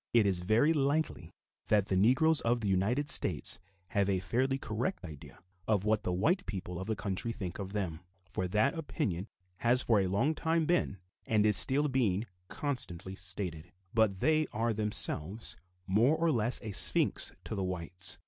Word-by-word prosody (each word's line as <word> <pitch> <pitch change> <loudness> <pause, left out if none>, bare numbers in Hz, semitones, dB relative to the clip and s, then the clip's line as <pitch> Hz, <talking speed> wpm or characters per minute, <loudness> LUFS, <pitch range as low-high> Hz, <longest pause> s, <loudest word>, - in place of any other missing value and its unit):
It 115 -3 +5
is 95 -3 +3
very 110 - +3
likely 140 - -1 0.4
that 105 -2 +3
the 95 - +1
Negroes 135 - +4
of 120 +1 0
the 105 - -2
United 105 +10 +1
States 85 - +3 0.3
have 100 +2 +1
a 95 -2 +1
fairly 130 +8 0
correct 120 - -3
idea 75 -4 -11 0.3
of 105 -2 +1
what 110 0 +2
the - - -2
white 165 - 0
people 90 -3 -5
of 95 - -6
the 110 - -1
country 100 +3 -2
think 95 -6 -6
of 100 0 -6
them, 90 -6 -3 0.3
for 95 - -3
that 110 +9 +1
opinion 105 - -3 0.3
has 120 +4 +2
for 110 -3 +3
a 95 - 0
long 115 +12 +1
time 160 +1 0
been 170 - 0 0.3
and 110 -4 +2
is 105 -1 +6
still 140 +9 +4
being 115 -7 0 0.2
constantly 95 - -1
stated; 90 -3 -5 0.2
but 110 -4 +2
they 155 +2 +2
are 115 +1 -1
themselves 105 -2 -1 0.3
more 115 +10 +3
or 165 0 +2
less 120 -2 0
a 110 - -5
sphinx - - +1
to - - -6
the 100 -2 -2
whites. 90 0 -1
105 Hz, 175 wpm, -31 LUFS, 95-130 Hz, 0.4 s, is